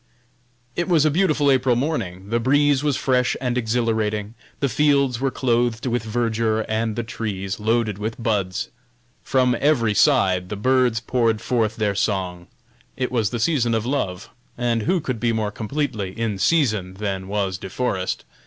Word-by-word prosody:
It 175 - -1
was 160 -4 +4
a 155 - +3
beautiful 155 -4 +2
April 130 -2 +3
morning; 100 - -3
the 115 - +2
breeze 145 +3 +3
was 145 -3 +1
fresh 125 -2 +1
and 125 -2 -1
exhilarating; 110 -3 -1 0.3
the 140 - +1
fields 140 -3 +2
were 135 - +2
clothed 120 -2 0
with 120 -1 0
verdure, 110 -1 0
and 110 0 -1
the 120 - -2
trees 105 -2 -4
loaded 110 -2 0
with 110 +3 -4
buds. 100 -5 -1 0.5
From 125 -2 +2
every 125 -7 +2
side 95 -9 +3
the 105 - -3
birds 125 +1 +2
poured 115 -3 +1
forth 115 -2 0
their 105 -2 0
song. 90 -3 -2 0.5
It 130 -2 -2
was 115 -5 +1
the 120 - -3
season 120 -3 +1
of 110 0 -1
love, 100 -9 -2 0.3
and 120 -2 0
who 180 - +1
could 130 -5 -3
be 115 0 +1
more 110 -2 -1
completely 110 -4 -3
"in 110 -4 -1
season" 105 - +1
than 95 -2 -3
was 95 -2 -2
De 95 - -7
Forest? 95 -5 -2
115 Hz, 165 wpm, -22 LUFS, 105-130 Hz, 0.5 s, was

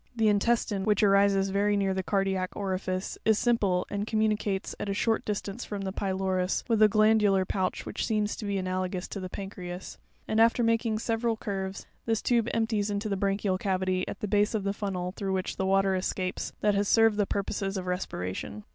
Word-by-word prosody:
'The 220 -2 +3
intestine, 205 -1 +1
which 210 0 +2
arises 195 -1 +4
very 205 +1 +2
near 195 -1 +1
the 190 - -1
cardiac 190 -1 0
orifice, 185 -1 -3
is 220 -1 +4
simple, 200 -7 +2
and 205 +1 -2
communicates, 215 -3 0
at 205 - -3
a 195 - -1
short 225 +2 +1
distance 210 +2 -3
from 205 -1 -5
the 190 -1 -3
pylorus, 190 -1 -1
with 225 -3 +2
a 215 - +9
glandular 210 -2 +4
pouch 185 0 -2
which - - -3
seems 215 -2 0
to - - -8
be 200 -1 -1
ana 185 0 -1
logous 185 0 -3
to 200 - -6
the 185 -1 -5
pancreas; 185 -2 -7 0.3
"and, 220 +1 +2
after 230 +1 +4
making 230 -1 +1
several 225 0 -1
curves, 195 -2 -4 0.2
this 225 -1 +2
tube 235 -2 +2
empties 220 -2 0
into 205 +1 -2
the 200 - 0
branchial 195 -1 0
cavity, 185 -1 0
at - - -7
the 210 - -1
base 210 +2 +2
of 210 - -1
the 200 0 0
funnel 185 -3 -3
through 195 0 -3
which 185 -1 -2
the 190 - 0
water 195 0 +3
escapes 185 0 -2
that 210 -1 +3
has 200 0 +1
served 225 -1 +4
the 205 -2 +1
purposes 195 0 -2
of 185 - -4
respiration. 105 - -4
200 Hz, 200 wpm, -28 LUFS, 190-215 Hz, 0.3 s, a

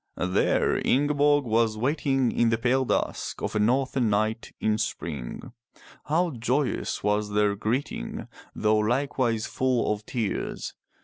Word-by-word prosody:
There 90 +1 +1
Ingeborg 145 +1 +3
was 110 -1 +1
waiting 135 0 +1
in 120 - +2
the 115 - +2
pale 125 +3 +1
dusk - - -2
of - - -3
a - - +2
northern 125 +2 +2
night 110 +2 0
in 110 0 +1
spring. 85 - -5 0.5
How 165 +4 +1
joyous 125 +3 -1
was 105 0 0
their 105 -1 +2
greeting, 110 - -3 0.3
though 110 0 +2
likewise 120 -1 0
full 130 -4 +1
of 105 0 -7
tears. 115 -5 -3
115 Hz, 130 wpm, -26 LUFS, 105-135 Hz, 0.5 s, Ingeborg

